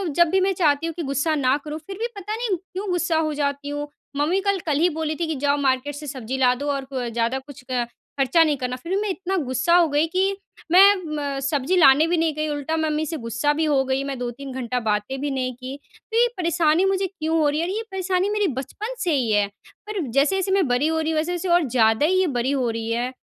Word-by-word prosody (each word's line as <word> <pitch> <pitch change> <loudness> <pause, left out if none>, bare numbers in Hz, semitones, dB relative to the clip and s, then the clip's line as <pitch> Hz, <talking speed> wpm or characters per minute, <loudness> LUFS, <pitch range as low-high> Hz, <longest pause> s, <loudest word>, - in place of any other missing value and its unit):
जब 345 0 +5
भी 380 - +2
मैं 385 +1 +2
चाहती 310 -4 +2
हूँ 330 - -4
कि 340 - -4
गुस्सा 280 +3 0
ना 265 -2 +2
करूँ, 300 0 -4
फिर 390 - -7
भी 465 - 0
पता 410 +2 -4
नहीं 445 -5 -1
क्यों 380 +3 -7
गुस्सा 355 -2 +1
हो 310 -1 0
जाती 285 -1 -2
हूँ। 290 0 -4 0.3
मम्मी 315 +7 +2
कल 400 -1 +1
कल 300 -4 +1
ही 345 +3 +4
बोली 315 -1 -3
थी 340 - 0
कि, 320 - -2
"जाओ, 285 +1 +1
मार्केट 270 0 0
से 295 +1 -8
सब्ज़ी 260 -1 -4
ला 250 -1 +4
दो 285 +3 -5
और 275 -1 -3
कु 270 0 -11
अ, 250 -2 -2
ज़्यादा 235 +3 -1
कुछ 275 0 -13
अ, 250 -1 0 0.4
खर्चा 300 +5 +4
नहीं 300 -3 +1
करना।" 250 -1 -3
फिर 295 +8 -8
भी 400 - +1
मैं 425 - -1
इतना 380 0 -2
गुस्सा 260 +7 +2
हो 350 -2 +5
गई 295 +2 +2
कि 380 +3 0 0.3
मैं 390 +3 +8 0.4
म - - -2
सब्ज़ी 285 +5 0
लाने 305 -1 +6
भी 345 +1 +1
नहीं 325 -1 +1
गई, 305 0 -1
उल्टा 295 +2 -2
मम्मी 310 -1 0
से 320 +1 -4
गुस्सा 235 +6 +1
भी 315 +2 0
हो 285 -3 +2
गई। 265 +1 0
मैं 275 -1 -4
2-3 250 +3 -5
घंटा 250 -1 -2
बातें 215 +3 -1
भी 290 0 -1
नहीं 255 -1 -2
की। 255 +2 -7 0.4
तो 450 - 0
ये 480 +1 +5
परेशानी 335 0 +2
मुझे 385 0 +1
क्यों 325 -3 -2
हो 305 -2 +3
रही 295 +1 -1
है? 335 - 0
और - - -2
ये 445 - -1
परेशानी 375 0 0
मेरी 415 -1 +1
बचपन 425 - -5
से 350 -4 0
ही 245 -5 0
है। 205 -1 +3 0.4
पर 425 -1 -3
जैसे-जैसे 305 +10 +1
मैं 380 -5 +3
बड़ी 250 +4 +2
हो 320 0 0
रही 320 0 -1
हूँ, 315 - -1
वैसे-वैसे 350 +3 -1
और 350 - 0
ज़्यादा 225 +2 +3
ही 370 +4 +3
ये 375 - +2
बड़ी 255 +3 0
हो 260 -4 0
रही 225 0 -3
है। 240 +2 -1
300 Hz, 260 wpm, -23 LUFS, 265-355 Hz, 0.4 s, मैं